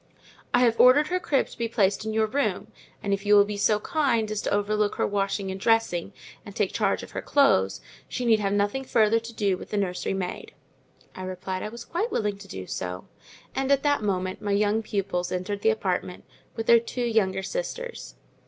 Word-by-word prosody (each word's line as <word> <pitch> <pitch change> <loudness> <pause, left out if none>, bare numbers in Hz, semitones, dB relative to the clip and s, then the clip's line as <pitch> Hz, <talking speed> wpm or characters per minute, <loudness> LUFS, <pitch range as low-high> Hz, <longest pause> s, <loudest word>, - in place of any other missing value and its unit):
I 245 - +3
have 230 -2 +3
ordered 275 +4 +6
her 365 0 0
crib 285 -6 +1
to - - -13
be 230 - 0
placed 205 -4 +1
in 220 - -2
your 220 0 +2
room, 275 +7 -1 0.3
and 200 - 0
if 195 0 -2
you 205 0 +5
will 200 0 +7
be 205 0 -4
so 210 +1 +2
kind 255 -10 0
as 215 - -2
to - - -2
overlook 205 +1 +1
her - - +1
washing 195 -1 -1
and 190 0 -6
dressing, 225 -6 +1 0.3
and - - -11
take - - 0
charge - - 0
of - - -10
her - - -4
clothes, 95 - +3 0.3
she 250 - -4
need 225 -2 +4
have 200 -1 0
nothing 205 +6 0
further 225 -3 +3
to 230 +1 -9
do 200 -4 0
with - - -10
the 210 - -2
nursery 190 -1 -1
maid." 180 -2 -5 0.6
I - - -9
replied 185 0 -4
I 210 - -4
was 235 +1 -9
quite 420 +8 -2
willing 205 -2 -1
to 200 - -11
do 95 - -7
so; 90 0 -5 0.5
and 270 +1 -1
at 275 -1 +3
that 290 -3 +2
moment 185 -2 -2
my 205 -1 -1
young 210 +2 +2
pupils 195 -4 -2
entered 185 +3 -3
the 220 - +3
apartment, 185 -4 -2 0.3
with 225 -1 -3
their 235 0 +7
two 245 +2 -4
younger 195 -5 +1
sisters. - - -5
210 Hz, 215 wpm, -26 LUFS, 195-235 Hz, 0.6 s, will